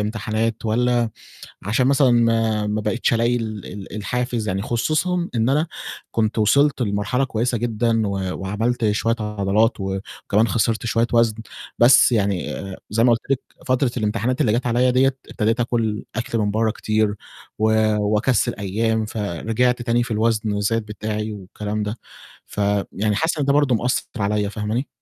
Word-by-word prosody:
امتحانات 110 Hz, +1 st, -2 dB
والَّا 120 Hz, +1 st, +1 dB, 0.5 s
عشان 115 Hz, +6 st, +1 dB
مثلًا 135 Hz, -1 st, +4 dB
ما 115 Hz, -2 st, +2 dB
ما 105 Hz, +1 st, -1 dB
بقيتش 115 Hz, +2 st, 0 dB
ألاقي 115 Hz, +1 st, +2 dB
ال 110 Hz, -4 st, -5 dB
ال 95 Hz, -1 st, -9 dB
الحافز، 120 Hz, +1 st, -2 dB
يعني 95 Hz, +1 st, -1 dB
خصوصًا 160 Hz, +10 st, 0 dB
إن 115 Hz, +1 st, +1 dB
أنا 150 Hz, +4 st, +2 dB, 0.4 s
كنت 110 Hz, 0 st, 0 dB
وصلت 140 Hz, +5 st, +3 dB
لمرحلة 105 Hz, +5 st, 0 dB
كويسة 120 Hz, 0 st, -1 dB
جدًا 115 Hz, -1 st, 0 dB
و 100 Hz, -, -2 dB, 0.3 s
وعملت 110 Hz, +3 st, 0 dB
شوية 115 Hz, +2 st, 0 dB
عضلات 105 Hz, +2 st, +1 dB
وكمان 100 Hz, +3 st, -1 dB
خسرت 115 Hz, +1 st, 0 dB
شوية 115 Hz, +1 st, +2 dB
وَزْن، 115 Hz, -2 st, +3 dB, 0.4 s
بس 120 Hz, +1 st, +6 dB
يعني 100 Hz, -4 st, +1 dB, 0.4 s
زي 115 Hz, +3 st, +2 dB
ما 125 Hz, -, +5 dB
قُلت 115 Hz, -, +1 dB
لِك 135 Hz, -, +2 dB, 0.3 s
فترة 130 Hz, 0 st, +2 dB
الامتحانات 115 Hz, +3 st, -1 dB
اللي 110 Hz, -, +3 dB
جات 120 Hz, +3 st, 0 dB
عليّا 125 Hz, +1 st, +3 dB
ديّة، 130 Hz, +1 st, +3 dB
ابتديت 115 Hz, +2 st, 0 dB
آكُل 115 Hz, -3 st, -1 dB
أكل 115 Hz, 0 st, -2 dB
من 105 Hz, -1 st, +1 dB
برّه 110 Hz, +1 st, +1 dB
كتير 110 Hz, -1 st, 0 dB, 0.4 s
و 110 Hz, 0 st, +2 dB, 0.3 s
وأكسِّل 105 Hz, +4 st, +1 dB
أيام، 110 Hz, +2 st, -1 dB
فرجعت 115 Hz, +5 st, -1 dB
تاني 120 Hz, 0 st, +1 dB
في 120 Hz, -, -6 dB
الوزن 110 Hz, 0 st, +1 dB
وزاد 105 Hz, +2 st, 0 dB
بتاعي 105 Hz, 0 st, -4 dB
والكلام 105 Hz, +2 st, -5 dB
ده، 105 Hz, +3 st, -4 dB, 0.5 s
فيعني 100 Hz, 0 st, -1 dB
حاسس 160 Hz, +4 st, 0 dB
إن 145 Hz, -, +1 dB
ده 140 Hz, -, +2 dB
برضه 145 Hz, -3 st, +3 dB
ماثّر 120 Hz, -1 st, -1 dB
عليّا، 105 Hz, 0 st, 0 dB
فاهماني؟ 110 Hz, +5 st, -3 dB
110 Hz, 155 wpm, -21 LUFS, 105-120 Hz, 0.5 s, بس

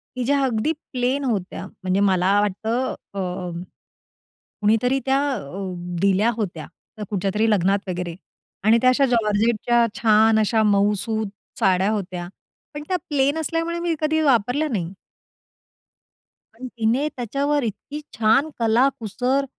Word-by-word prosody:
की 255 Hz, -, -2 dB
ज्या 280 Hz, +2 st, +2 dB
अगदी 245 Hz, +3 st, 0 dB, 0.2 s
प्लेन 255 Hz, +3 st, 0 dB
होत्या. 205 Hz, -7 st, -3 dB, 0.2 s
म्हणजे 185 Hz, +1 st, +1 dB
मला 195 Hz, 0 st, +3 dB
वाटतं 220 Hz, +5 st, -1 dB, 0.2 s
अ, 180 Hz, -2 st, -4 dB, 1.1 s
कुणीतरी 225 Hz, +5 st, +2 dB
त्या 270 Hz, 0 st, +3 dB, 0.2 s
अ, 185 Hz, -, -5 dB, 0.3 s
दिल्या 200 Hz, +3 st, +3 dB
होत्या, 180 Hz, -9 st, -4 dB, 0.3 s
त्या 215 Hz, -2 st, -6 dB
कुठच्यातरी 205 Hz, +2 st, 0 dB
लग्नात 195 Hz, 0 st, +1 dB
वगैरे 175 Hz, -2 st, -4 dB, 0.5 s
आणि 220 Hz, +2 st, +6 dB
त्या 255 Hz, -, +5 dB
अशा 265 Hz, +2 st, +3 dB
जॉर्जेटच्या 235 Hz, 0 st, +2 dB, 0.2 s
छान 220 Hz, 0 st, +5 dB
अशा 220 Hz, +1 st, +2 dB
मउसुत 210 Hz, +1 st, +1 dB, 0.3 s
साड्या 190 Hz, +1 st, +3 dB
होत्या, 180 Hz, -4 st, -4 dB, 0.5 s
पण 295 Hz, 0 st, -6 dB
त्या 370 Hz, -, +1 dB
प्लेन 285 Hz, +1 st, +1 dB
असल्यामुळे 330 Hz, +2 st, -2 dB
मी 340 Hz, -1 st, -1 dB
कधी 315 Hz, +1 st, +1 dB
वापरल्या 265 Hz, +1 st, +2 dB
नाही. 190 Hz, -7 st, -3 dB, 1.6 s
आणि 255 Hz, +3 st, -7 dB
तिने 235 Hz, +6 st, +1 dB
त्याच्यावर 280 Hz, +4 st, -1 dB
इतकी 280 Hz, +7 st, -5 dB, 0.2 s
छान 230 Hz, +7 st, +3 dB
कला-कुसर, 245 Hz, +2 st, +1 dB
225 Hz, 125 wpm, -22 LUFS, 200-265 Hz, 1.6 s, आणि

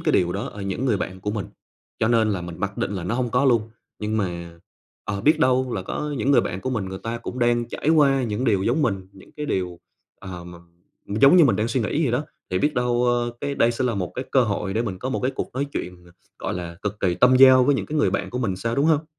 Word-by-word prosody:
cái -, -, 0 dB
điều 90 Hz, -1 st, +2 dB
đó 100 Hz, -, -3 dB
ở 100 Hz, -, -8 dB
những 100 Hz, +6 st, -3 dB
người 115 Hz, -6 st, +2 dB
bạn 95 Hz, 0 st, -5 dB
của 105 Hz, -, -2 dB
mình, 105 Hz, -3 st, -3 dB, 0.5 s
cho 110 Hz, -, +2 dB
nên 115 Hz, -2 st, +3 dB
là 95 Hz, -3 st, -1 dB
mình 85 Hz, -1 st, -8 dB
mặc 100 Hz, +1 st, -3 dB
định -, -, -1 dB
là 95 Hz, -4 st, -4 dB
nó 105 Hz, -, -1 dB
hông 125 Hz, -1 st, -1 dB
có 125 Hz, +4 st, +2 dB
luôn. 115 Hz, -4 st, +2 dB, 0.3 s
Nhưng 105 Hz, +1 st, -2 dB
mà, 85 Hz, -4 st, -4 dB, 0.5 s
ờ, 100 Hz, -2 st, -3 dB
biết 150 Hz, +8 st, +4 dB
đâu 130 Hz, -1 st, +2 dB
là 95 Hz, -, -2 dB
có 150 Hz, +9 st, -4 dB
những 130 Hz, +5 st, +1 dB
người 130 Hz, -4 st, +6 dB
bạn 95 Hz, -4 st, -4 dB
của 130 Hz, -, -3 dB
mình, 110 Hz, -6 st, -1 dB
người 95 Hz, 0 st, -6 dB
ta 115 Hz, +1 st, -3 dB
cũng 125 Hz, -, -7 dB
đang 120 Hz, -1 st, +1 dB
trải -, -, -3 dB
qua 140 Hz, -4 st, +4 dB
những 110 Hz, +1 st, -2 dB
điều 100 Hz, -6 st, +2 dB
giống 125 Hz, +8 st, +1 dB
mình, 95 Hz, -6 st, -1 dB
những 95 Hz, -, -17 dB
cái 150 Hz, 0 st, -4 dB
điều, 90 Hz, -2 st, -2 dB, 0.4 s
ờ, 90 Hz, -2 st, -8 dB
mà 85 Hz, 0 st, -11 dB, 0.5 s
giống 135 Hz, -, +5 dB
như 170 Hz, -, +8 dB
mình 135 Hz, -, +3 dB
đang 110 Hz, +2 st, 0 dB
suy 125 Hz, +2 st, 0 dB
nghĩ 130 Hz, +8 st, 0 dB
vậy 125 Hz, -6 st, +1 dB
đó, 140 Hz, +5 st, 0 dB, 0.3 s
thì 90 Hz, -, +1 dB
biết 150 Hz, +5 st, +1 dB
đâu, 125 Hz, 0 st, +1 dB
ơ, 120 Hz, 0 st, +1 dB
cái 140 Hz, 0 st, -2 dB
đây 120 Hz, -3 st, +3 dB
sẽ 120 Hz, -, -2 dB
là 120 Hz, -, 0 dB
một 90 Hz, -3 st, -3 dB
cái 130 Hz, -, -4 dB
cơ 130 Hz, -, +5 dB
hội 100 Hz, -2 st, -2 dB
để 115 Hz, -, +1 dB
mình 95 Hz, -5 st, -4 dB
có 130 Hz, -, -4 dB
một 130 Hz, -, -2 dB
cái 130 Hz, -, 0 dB
cuộc -, -, -4 dB
nói 140 Hz, +2 st, -1 dB
chuyện 90 Hz, 0 st, -6 dB
ng 85 Hz, -, -18 dB, 0.3 s
gọi -, -, -3 dB
là, 85 Hz, -1 st, -6 dB
cực 105 Hz, 0 st, -4 dB
kỳ 90 Hz, -2 st, +1 dB
tâm 125 Hz, +7 st, +5 dB
giao 130 Hz, -1 st, +8 dB
với 145 Hz, +2 st, +3 dB
những -, -, -2 dB
cái 155 Hz, 0 st, -2 dB
người -, -, +3 dB
bạn -, -, -2 dB
của 125 Hz, -, -3 dB
mình 105 Hz, -7 st, -1 dB
sao, 115 Hz, +5 st, -2 dB
đúng 140 Hz, +3 st, +2 dB
hông? 160 Hz, -1 st, +3 dB
115 Hz, 290 wpm, -23 LUFS, 95-130 Hz, 0.5 s, như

